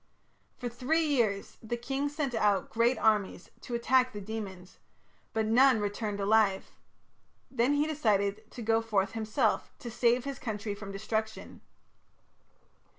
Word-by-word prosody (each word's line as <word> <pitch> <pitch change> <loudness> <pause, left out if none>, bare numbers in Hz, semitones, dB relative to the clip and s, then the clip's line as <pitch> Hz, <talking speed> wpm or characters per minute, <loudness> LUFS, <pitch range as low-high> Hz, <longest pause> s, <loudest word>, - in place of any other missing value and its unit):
For 250 - -4
three 270 +7 0
years 230 -9 0
the 235 +1 -3
king 270 +4 -2
sent 290 -3 -3
out 210 -3 +1
great 235 +3 +2
armies 210 -4 +1
to 240 - -5
attack 255 +1 +2
the 210 - -5
demons, 195 -3 -7 0.5
but 220 -1 0
"none 245 +2 +5
returned 205 0 -3
alive". 200 -1 +2 0.8
Then 255 +3 +2
he 290 +1 +2
decided 215 -8 0
to 240 - -8
go 225 +1 +2
forth 210 -3 0
himself 220 -1 0
to 240 - -8
save 240 +1 +2
his 275 -1 -5
country 210 -2 -4
from 200 -1 -8
destruction. 220 +2 -4
225 Hz, 140 wpm, -30 LUFS, 205-250 Hz, 0.8 s, none